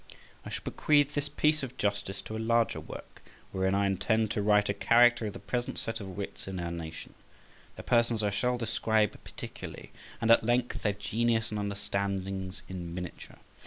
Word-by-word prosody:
I - - -7
shall - - -5
bequeath 145 -1 +3
this 145 0 -1
piece 150 +1 +2
of 130 -2 -6
justice 100 -1 -1
to 110 - -6
a - - -3
larger 115 0 +2
work, - - -10 0.3
wherein 95 0 +1
I 100 0 +3
intend 110 +3 +1
to 105 - 0
write 105 0 +4
a 100 - +1
character 120 +2 +5
of 105 - -5
the - - -7
present 120 -1 -3
set 115 0 -3
of 95 -3 -7
wits 100 -1 -6
in 95 -1 -4
our 85 -1 -3
nation; 80 -2 -7 0.6
their - - -8
persons 115 -2 +2
I 105 - +2
shall 125 +4 +1
describe 110 -2 +1
particularly - - -8 0.3
and 115 0 +3
at 115 - +7
length, 120 +2 +1
their 105 - +1
genius 110 +2 0
and 105 - -2
understandings 100 -2 -3
in 85 -2 -6
miniature. 90 -1 -7
105 Hz, 185 wpm, -30 LUFS, 100-120 Hz, 0.6 s, at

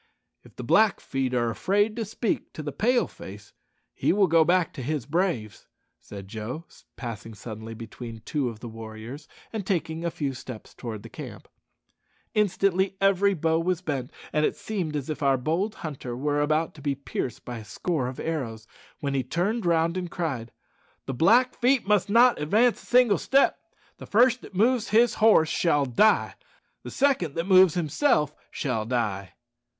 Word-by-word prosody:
"If - - -19
the 125 - -7
Blackfeet 135 - +2
are 120 -1 +1
afraid 205 - +1
to 230 -2 -2
speak 220 +1 -3
to 155 - -7
the 145 - -4
Pale 240 - +2
face, 105 +2 -11 0.4
he - - +1
will 200 +2 +4
go 165 -2 +5
back 175 0 +2
to - - -7
his 140 -1 -2
braves," 150 - -2 0.3
said 100 -2 -10
Joe, 115 - -6 0.3
passing 115 -2 -7
suddenly 110 +1 -8
between 115 0 -9
two 135 +2 -1
of 110 -1 -10
the 120 - -6
warriors 115 +4 -9 0.3
and 220 -2 -3
taking 165 -4 -2
a 170 - 0
few 145 -4 -3
steps 130 -3 -9
towards 110 -4 -7
the - - -10
camp. - - -9 0.9
Instantly 195 -2 +1
every 195 0 +3
bow 160 0 +1
was 180 +1 -1
bent, 135 -6 -3 0.2
and 150 - +2
it - - +1
seemed 180 -8 -4
as 140 -3 -3
if 155 -1 -4
our 135 -2 +3
bold 165 - -1
hunter 130 -5 -5
were 145 +2 0
about 155 +2 +1
to 150 - -14
be 140 -1 -1
pierced 135 -3 -5
by 120 -2 -5
a - - -9
score 130 +5 -2
of 130 - -7
arrows, 120 -9 -4 0.4
when 140 -1 -2
he 135 - +1
turned 185 - -1
round 165 +1 +2
and 180 -1 -3
cried, 140 -10 -3 0.5
"The 135 - -3
Blackfeet 250 - +3
must 205 -1 +2
not 235 -2 +5
advance 220 +10 +2
a - - -18
single 245 -5 +4
step. 275 +2 +3 0.4
The - - -10
first 245 +4 +4
that - - -13
moves 230 +3 +2
his 235 +3 +4
horse 210 -8 +6
shall 145 -5 +2
die. 135 - +3 0.5
The - - -8
second 260 - +1
that 165 +1 -1
moves 185 -3 +6
himself 160 - +1 0.2
shall 115 -6 -2
die." 105 -6 -2
155 Hz, 175 wpm, -26 LUFS, 125-195 Hz, 0.9 s, horse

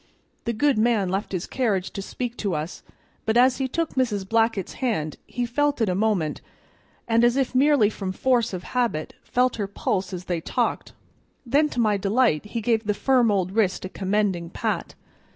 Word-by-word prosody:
The 235 - 0
good 275 +1 +2
man 220 -4 +2
left 195 +3 -2
his 185 -3 -2
carriage 210 -8 -1
to 200 - -5
speak 240 +4 -5
to 195 -5 -1
us, 155 +4 -4 0.4
but 220 +1 +1
as 255 +1 +5
he 265 - 0
took 330 +4 -2
Mrs. 210 -7 0
Blackett's 225 -2 +1
hand 160 -12 -1
he 245 0 -2
held 290 +4 0
it 225 -4 +2
a - - +1
moment, 190 -6 0 0.7
and, 230 0 +3
as 240 +2 +4
if 265 -2 0
merely 275 -3 +4
from 195 -3 -4
force 240 +3 +1
of 180 -2 -5
habit, 235 -12 -1
felt 250 0 +1
her 205 -3 -2
pulse 195 -1 -2
as 180 -1 -6
they 175 -2 -2
talked; - - -2 0.5
then 290 +5 +3
to 245 - -4
my 215 -3 +3
delight 205 -3 +2
he 230 +2 -4
gave 225 0 +1
the 210 0 0
firm 250 0 +3
old 190 -3 +1
wrist 190 -4 +1
a - - -5
commending 190 -3 -1
pat. - - -3
220 Hz, 190 wpm, -24 LUFS, 190-245 Hz, 0.7 s, as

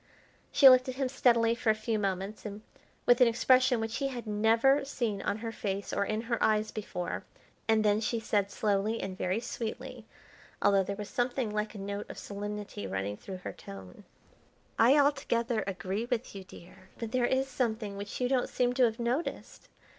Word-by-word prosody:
She 275 - +7
looked 255 0 +7
at 255 - -4
him 270 0 0
steadily 235 -3 +3
for 235 -1 -1
a 215 - +5
few 215 0 -2
moments, 195 +1 -3
and 210 0 -7 0.4
with 245 +1 +5
an 250 - +8
expression 255 +1 +4
which 225 +1 -3
he 275 - 0
had 245 -3 -6
never 225 +6 +3
seen 235 -7 -2
on 200 - -1
her 225 - -2
face 200 -2 -4
or 200 - +1
in 215 +1 -1
her 235 0 -2
eyes 215 0 +2
before, 200 -4 -4 0.4
and 220 -1 +3
then 210 +1 +3
she 230 +1 -1
said 205 -3 0
slowly 210 +2 0
and 190 -1 -4
very 185 +3 -1
sweetly, 240 0 -6 0.5
although 200 -1 +4
there 200 +2 -4
was 205 0 -6
something 245 -2 -1
like 210 +1 -2
a - - -6
note 200 +1 -5
of - - -8
solemnity 205 - -6
running 95 +2 -3
through 190 - -8
her - - -4
tone: 95 -2 -11 0.8
"I 250 +6 +6
altogether 245 -6 +1
agree 190 +3 -3
with 245 -1 -3
you, 195 -1 -8
dear; 185 +1 -15
but 230 -2 -5
there 245 -1 +2
is 265 +1 +1
something 220 -6 -2
which 200 +1 -6
you 250 - +1
don't 255 -1 +1
seem 245 0 +1
to 250 0 +4
have 225 -1 -1
noticed. 245 +7 -3
220 Hz, 190 wpm, -30 LUFS, 200-245 Hz, 0.8 s, an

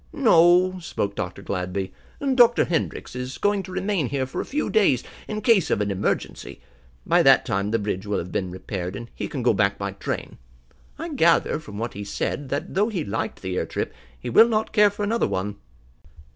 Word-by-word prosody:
"No," 185 - +5
spoke 100 -11 -3
Dr. 90 +1 -5
Gladby, 95 0 -3 0.4
"Dr. 240 -2 +5
Hendrix 165 -6 -2
is 125 +1 -5
going 205 -1 +1
to 190 - -10
remain 190 - -1
here 135 -2 -1
for 130 - -4
a - - -6
few 295 +2 -2
days, 190 - +3 0.2
in 215 0 -4
case 220 - +4
of - - +1
an 105 -1 0
emergency. 95 - -3 0.5
By - - +4
that - - +6
time 100 +1 -1
the 115 - +1
bridge 100 -2 -3
will 105 - 0
have 90 - -5
been 95 -2 -2
repaired, 90 0 -5
and 115 +3 -8
he - - -4
can 135 -4 -4
go 120 - +4
back 100 -1 +1
by 100 0 -3
train. 100 - -5 0.6
I 330 +3 -5
gather, 170 - +3
from 105 -10 -10
what 115 +2 -3
he 105 - -6
said, 135 +6 -3
that 145 +7 -3
though 205 +4 +2
he 180 -8 -3
liked 100 0 -4
the 95 -1 -3
air - - -1
trip, - - -3 0.3
he - - -5
will 230 +1 +7
not 220 -1 -1
care 210 -2 +6
for 205 +1 -5
another 225 +3 +1
one." 100 +2 -3
135 Hz, 205 wpm, -24 LUFS, -, 0.6 s, will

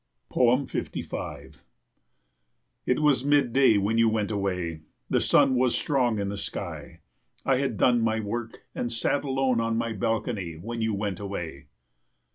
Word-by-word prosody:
55 125 +2 -1 1.3
It 125 - +2
was 140 -4 +4
mid 140 -4 +3
day 130 -5 +5
when 105 +3 +1
you 115 -1 +5
went 110 -1 -1
away. 90 -6 -2 0.3
The - - +3
sun 130 - +4
was 125 -1 +2
strong 125 -6 +1
in 100 -1 -1
the 100 - -4
sky. - - -6 0.4
I 135 - +3
had 130 -5 -1
done 120 -2 +4
my 110 0 +1
work 110 +2 -5
and 120 - -3
sat 130 +5 0
alone 135 -3 +1
on 115 0 0
my 115 -1 -1
balcony 110 -4 -2
when 115 +8 -5
you 110 -2 0
went 100 -2 -3
away. 85 -7 -6
115 Hz, 150 wpm, -26 LUFS, 100-125 Hz, 1.3 s, day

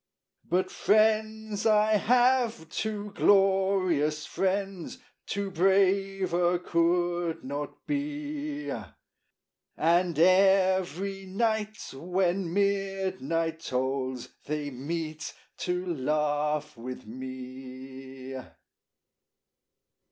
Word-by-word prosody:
But 185 +2 0
friends 215 0 +2
I 215 0 +4
have, 245 -5 +3
two 210 +1 -3
glorious 190 -7 +3
friends, 195 -1 -2 0.3
Two 200 -1 -2
braver 190 -1 +2
could 175 0 0
not 145 +2 -6
be; 295 0 -3 1.1
And 170 0 +2
every 190 +1 +3
night 215 +2 0 0.2
when 180 +4 0
midnight 190 -5 0
tolls 130 -2 -2 0.2
They 150 -1 -2
meet 155 +3 -4 0.2
to 180 0 -1
laugh 150 +1 0
with 125 +2 -7
me 130 +2 -8
180 Hz, 70 wpm, -28 LUFS, 150-200 Hz, 1.1 s, I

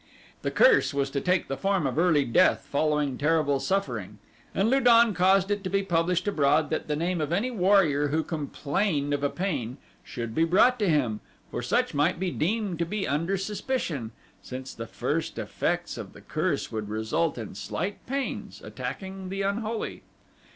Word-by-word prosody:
The - - -1
curse 460 - +4
was 140 -1 0
to 140 - -1
take 180 0 +1
the 135 - -2
form 195 0 0
of 135 +3 -1
early 160 -5 +4
death 180 +11 +3
following 150 -2 0
terrible 150 -2 +2
suffering, 195 +6 -2 0.4
and 195 - +2
Lu 265 +4 +4
don 235 -3 +6
caused 190 +2 +3
it 205 -1 -1
to 185 - -2
be 195 +1 +1
published 180 0 +1
abroad 150 -4 +2
that 155 - -2
the 150 - 0
name 170 +2 -1
of 150 0 -2
any 210 +9 0
warrior 180 - +3
who 155 +3 0
complained 150 0 -1
of 145 - -1
a 145 - +2
pain 140 - -3 0.3
should 115 -2 -5
be 160 - +2
brought 215 +9 +4
to 205 -4 +2
him, 125 -9 +1 0.3
for - - -3
such - - 0
might 150 +5 +1
be 185 -1 -1
deemed 195 +1 -1
to 170 - +1
be 205 +2 -2
under 165 +7 0
suspicion, 195 - -3 0.3
since 130 +1 -7
the 115 0 -7
first - - -2
effects - - -2
of - - -8
the - - -13
curse - - -2
would 110 -2 -4
result 110 +10 -1
in 115 -3 -6
slight 180 - -4
pains 275 +1 -3
attacking 190 -1 -6
the 195 +1 -2
unholy. 215 +3 -2
170 Hz, 180 wpm, -27 LUFS, 145-195 Hz, 0.4 s, don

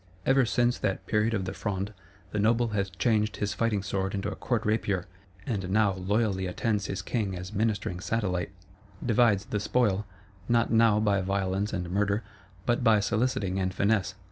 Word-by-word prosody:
Ever 135 -2 +4
since 120 +1 +2
that 95 -2 -2
period 110 +1 +1
of 95 -2 -2
the 95 - -4
Fronde, 100 0 -3 0.4
the 105 - -1
Noble 115 +3 +3
has 100 -2 -1
changed 105 +2 +1
his 105 -1 -1
fighting 110 -4 0
sword 95 0 -2
into 100 +1 -2
a - - -5
court 120 -3 -1
rapier, 105 -4 0 0.4
and 95 -6 -2
now 100 0 +3
loyally 95 0 0
attends 105 +2 -1
his 95 -2 -4
king 105 -6 -1
as 90 +3 -7
ministering 100 -4 -1
satellite; 90 -4 -1 0.6
divides 115 -4 +3
the 105 - -2
spoil, 105 -2 +1 0.4
not 120 0 +3
now 115 -2 +5
by 100 -2 +2
violence 95 +1 -1
and 90 -3 -3
murder, 100 +2 +1 0.4
but 120 +1 +1
by 110 -3 +5
soliciting 100 -3 0
and 95 0 -1
finesse. 100 -3 +1
105 Hz, 170 wpm, -28 LUFS, 95-110 Hz, 0.6 s, now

